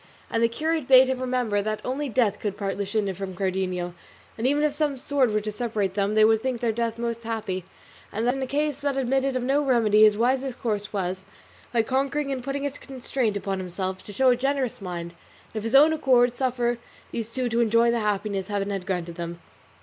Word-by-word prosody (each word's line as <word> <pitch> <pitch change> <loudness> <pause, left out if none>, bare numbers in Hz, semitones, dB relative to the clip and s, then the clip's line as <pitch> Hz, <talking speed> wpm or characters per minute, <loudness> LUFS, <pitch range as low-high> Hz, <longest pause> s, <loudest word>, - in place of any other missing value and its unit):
And 230 - +1
the 230 - +5
curate 310 +3 -1
bade 260 0 +7
him 260 -1 -1
remember 250 -5 0
that 215 +1 -2
only 275 +3 -2
death 220 -4 +1
could 205 -2 -3
part 195 -2 -2
Luscinda 200 0 -1
from 190 0 -6
Cardenio; 185 -2 -2 0.4
that 230 +3 0
even 290 +2 +2
if 300 -1 +2
some 290 -2 -1
sword 270 -1 +1
were 215 0 +1
to 215 +1 -4
separate 210 -3 -2
them 200 +1 0
they 215 0 +6
would 220 0 +4
think 255 -1 -2
their 235 -1 +1
death 230 0 -2
most 235 0 -3
happy; 215 -6 -3 0.5
and 220 +3 -2
that 245 - +3
in 270 - -4
a 265 - -2
case 295 +1 -1
that 280 -1 -1
admitted 270 +1 +1
of 255 - -1
no 275 +3 +2
remedy 225 -6 +3
his 215 -1 +6
wisest 255 +2 0
course 210 -3 -2
was, 190 -2 -2 0.5
by 230 -2 +2
conquering 275 +3 -1
and 260 -2 -3
putting 275 +2 -3
a 285 - -1
constraint 260 -5 -3
upon 195 -1 -3
himself, 185 +1 -4
to - - -8
show 255 +6 +3
a - - +4
generous 265 -2 -1
mind, 170 -2 -5 0.4
and 220 - -2
of - - -8
his 225 +4 0
own 300 +3 +7
accord 250 -5 +3
suffer 240 -2 0 0.3
these 230 -1 -4
two 255 +1 -1
to 235 0 +1
enjoy 230 +1 +4
the 235 - +1
happiness 205 -2 -1
Heaven 205 -1 -2
had 195 -2 -4
granted 175 -2 -3
them. 170 0 -5
230 Hz, 220 wpm, -25 LUFS, 200-260 Hz, 0.5 s, bade